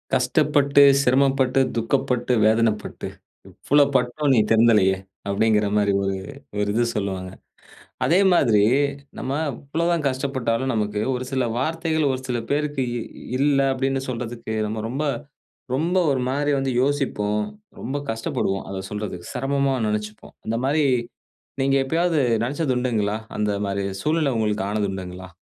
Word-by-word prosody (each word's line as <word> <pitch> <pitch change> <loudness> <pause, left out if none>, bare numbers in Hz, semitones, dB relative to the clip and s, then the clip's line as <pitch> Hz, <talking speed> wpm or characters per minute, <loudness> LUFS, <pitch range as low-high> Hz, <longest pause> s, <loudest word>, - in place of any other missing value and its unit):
"கஷ்டப்பட்டு, 140 +2 +3 0.2
சிரமப்பட்டு, 135 0 +3 0.2
துக்கப்பட்டு, 125 +1 0
வேதனைப்பட்டு, 110 -1 +1 0.4
இவ்வளோ 145 0 +3
பட்டும் 130 +3 +1
நீ 120 - +4
திருந்தலயே." 110 -4 +4 0.3
அப்படீங்கிறமாரி 105 0 +2
ஒரு 95 0 -1 0.4
ஒரு 105 0 0
இது 120 +2 +2
சொல்லுவாங்க. 95 -3 -3 0.8
அதே 175 - +4
மாதிரி 115 -11 +4 0.6
நம்ம 130 - -4 0.2
இவ்வளவு 155 +7 -2
தான் 165 -3 -1
கஷ்டப்பட்டாலும், 130 -2 -1
நமக்கு 105 -1 -1
ஒரு 125 0 -3
சில 130 -1 +1
வார்த்தைகள் 160 +1 0
ஒரு 130 - -3
சில 125 -1 -1
பேருக்கு 145 -2 0 0.5
"இல்ல" 140 0 +3 0.2
அப்படீன்னு 135 0 -1
சொல்றதுக்கு, 115 -2 -5
நம்ம 110 0 -4
ரொம்ப 140 +5 -2 0.7
ரொம்ப 170 +7 +1
ஒரு 135 -2 +1
மாரி 145 +2 0
வந்து 135 -1 -1
யோசிப்போம். 130 -7 0 0.4
ரொம்ப 135 +4 -4
கஷ்டப்படுவோம், 110 -3 -2
அத 95 0 -4
சொல்றதுக்கு. 105 -4 -5
செரமமா 140 +1 0
நெனச்சுப்போம். 105 0 -4
அந்தமாரி 130 +7 0 0.8
நீங்க 135 +1 +2
எப்பயாவது 165 +2 +1 0.2
நெனச்சது 140 +2 -1
உண்டுங்களா? 110 -5 0 0.2
அந்தமாரி 100 -1 -1 0.2
சூழ்நிலை 155 -2 +1
உங்களுக்கு 105 -2 0
ஆனது 105 -1 -1
உண்டுங்களா? 95 -1 -7
125 Hz, 125 wpm, -23 LUFS, 105-140 Hz, 0.8 s, நீ